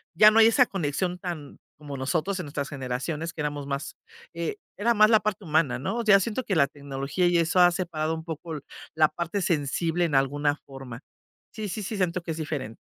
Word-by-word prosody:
ya 210 +5 +8
no 225 - +4
hay 220 - +8
esa 250 +3 +5
conexión 180 +1 -2
tan 170 -7 -6 0.2
como 145 -2 -7
nosotros 170 +8 -1
en 180 - -4
nuestras 140 -1 -4
generaciones, 140 +4 -4
que 160 - -5
éramos 145 -1 -3
más, 140 0 -4 0.4
eh, 170 +4 -3 0.2
era 235 +4 +2
más 215 0 +6
la 220 - +7
parte 210 -2 -3
humana, 155 -4 +2
¿no? 150 - -2
O 235 - -2
sea, 200 -2 +7
siento 230 +5 -2
que 195 - 0
la 140 -4 +4
tecnología 140 +4 -2
y 175 0 +3
eso 170 +2 +2
ha 175 0 +7
separado 160 -3 -2
un 160 - -7
poco 160 -1 -5 0.4
la 155 -1 +5
parte 170 +5 -3
sensible 170 0 0
en 155 -4 -1
alguna 145 +2 +2
forma. 135 -3 -9 0.5
Sí, 215 -1 -5
sí, 215 +3 -4
sí, 210 +2 -4
siento 180 -2 0
que 170 - -4
es - - -6
diferente. 145 -8 -4
165 Hz, 215 wpm, -26 LUFS, 145-185 Hz, 0.5 s, ya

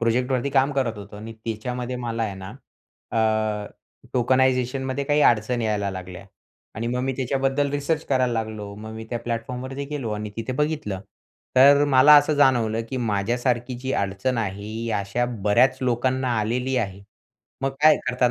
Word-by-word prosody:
प्रोजेक्टवरती 125 +3 0
काम 135 +1 +3
करत 125 -6 -1
होतो 100 0 -10
आणि 110 +2 -8
त्याच्यामध्ये 125 +3 -4
मला 115 -2 -3
आहे 105 -3 -2
ना, 95 0 -8 0.6
अ, 110 -2 0 0.5
टोकनायझेशन 130 +1 +2
मध्ये 130 +1 -2
काही 145 +2 +2
अडचणी 120 -2 +3
यायला 105 -2 0
लागल्या 90 -1 -8 0.5
आणि 115 +2 -3
मग 125 +1 -1
मी 135 - 0
त्याच्याबद्दल 135 +2 0
रिसर्च 145 +3 -1
करायला 130 -3 +1
लागलो. 110 -3 -4
मग 110 +2 -9
मी 110 0 -7
त्या 120 - -1
प्लॅटफॉर्मवरती 125 +4 -4
गेलो 135 -7 -3
आणि 105 0 -4
तिथे 115 +3 -3
बघितलं, 150 -8 -2 0.6
तर 140 +2 +7
मला 140 +2 +7
असं 150 +1 +4
जाणवलं, 120 -6 +3
की 130 - -3
माझ्यासारखी 120 +3 -1
जी 130 +1 -3
अडचण 100 +6 -1
आहे, 100 -2 -3
ही 115 +2 -4
अशा 100 +5 -1 0.2
बऱ्याच 125 +5 +4
लोकांना 130 +1 0
आलेली 125 +5 -1
आहे. 100 -5 -2 0.6
मग 135 - +1
काय 155 0 +7
करतात 125 -1 +2
120 Hz, 160 wpm, -24 LUFS, 110-130 Hz, 0.6 s, तर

